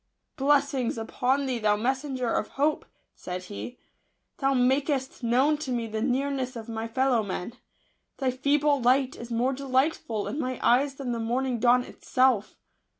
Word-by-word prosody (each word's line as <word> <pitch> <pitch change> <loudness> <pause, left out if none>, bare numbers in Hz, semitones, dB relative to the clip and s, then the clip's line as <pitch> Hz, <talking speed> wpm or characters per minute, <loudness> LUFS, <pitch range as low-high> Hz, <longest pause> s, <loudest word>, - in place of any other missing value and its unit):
" - - -52
Blessings 275 -4 +1
upon 255 +5 0
thee, 255 -3 -1
thou 210 -1 +2
messen 265 +4 -1
ger 245 -2 -1
of - - 0
hope 300 +2 +1
I" - - -35 0.2
said 180 0 -6
he; 205 +6 -7 0.3
" - - -50
thou 275 -1 +2
makest 265 +2 +1
known 260 +6 +3
to 275 -4 -4
me 240 -2 -1
the 220 -1 -4
nearness 265 +1 -1
of 225 -1 -7
my 225 0 -4
fellow 255 0 +2
men. 200 +1 -4 0.6
Thy 265 -2 0
feeble 285 +2 +2
light 255 +2 +3
is 235 - -9
more 240 +3 +1
delightful 260 -4 0
in 290 - -4
my 255 -3 -3
eyes 270 +3 +3
than 265 -3 -4
the 235 - -2
morning 245 +2 -1
dawn 245 +2 +4
itself. 255 -5 +1
255 Hz, 175 wpm, -27 LUFS, 235-275 Hz, 0.6 s, dawn